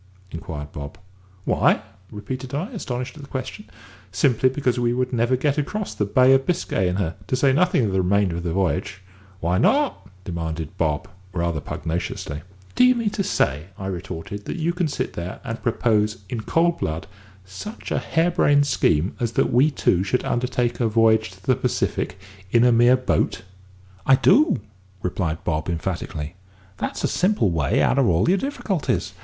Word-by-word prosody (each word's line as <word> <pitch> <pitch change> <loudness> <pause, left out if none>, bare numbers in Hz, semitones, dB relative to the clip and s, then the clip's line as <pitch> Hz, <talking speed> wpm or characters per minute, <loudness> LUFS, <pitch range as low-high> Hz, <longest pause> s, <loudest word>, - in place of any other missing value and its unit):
inquired 80 -4 -6
Bob. 70 +4 -7 0.5
"Why?" - - +3 0.3
repeated 125 +5 -6
I, 180 - -3
astonished 125 - -5
at - - -9
the 140 - -11
question. 130 - -6 0.4
"Simply 120 +6 +3
because 130 -2 0
we 120 0 +1
should 125 +1 -1
never 120 +2 +2
get 145 +3 +1
across 210 +8 -3
the 105 - -1
Bay 130 +5 +5
of 135 0 +2
Biscay 170 - 0
in 90 - -1
her, 90 -4 -1
to - - +1
say 135 +1 +3
nothing 165 -5 +3
of 100 - -1
the 95 0 +2
remainder 95 -1 +1
of - - -3
the 85 -1 -2
voyage." 95 +1 -1 0.4
"Why 90 +3 +1
not?" 280 - +2
demanded 80 -3 -4
Bob, 75 -2 -1 0.3
rather 85 -3 -1
pugnaciously. 80 -2 -4 0.3
"Do - - +4
you 250 0 +6
mean 230 -3 0
to 205 - -2
say," 70 - 0
I 95 - -6
retorted, 95 +2 -5
"that - - -4
you 170 +1 0
can 175 -2 0
sit 145 - -3
there 85 +2 -5
and 115 -3 -5
propose 105 -4 +1
in 115 - -3
cold 165 +8 +1
blood 80 +1 -2 0.4
such 100 - -8
a - - +1
hair 165 +2 +1
brained 145 -3 +4
scheme 85 - +1
as 120 -1 -1
that - - +1
we 130 +5 +5
two 95 - +1
should 125 +6 -1
undertake 125 0 0
a 120 - +2
voyage 110 -1 +3
to 95 0 -17
the - - +3
Pacific 90 +1 -1 0.3
in 120 +3 +4
a 125 - +5
mere 120 +2 +5
boat?" 125 -5 0 0.6
"I 135 - +8
do," 290 - +4 0.4
replied 85 -3 -2
Bob 80 +1 -1
emphatically. 85 -2 -3 0.4
"That's - - -4
a - - +3
simple 180 - +2
way 80 -5 +1
out 140 - +3
of 130 - +4
all 90 +2 +3
your 190 +2 +3
difficulties. 205 - -2
115 Hz, 180 wpm, -23 LUFS, 90-135 Hz, 0.6 s, I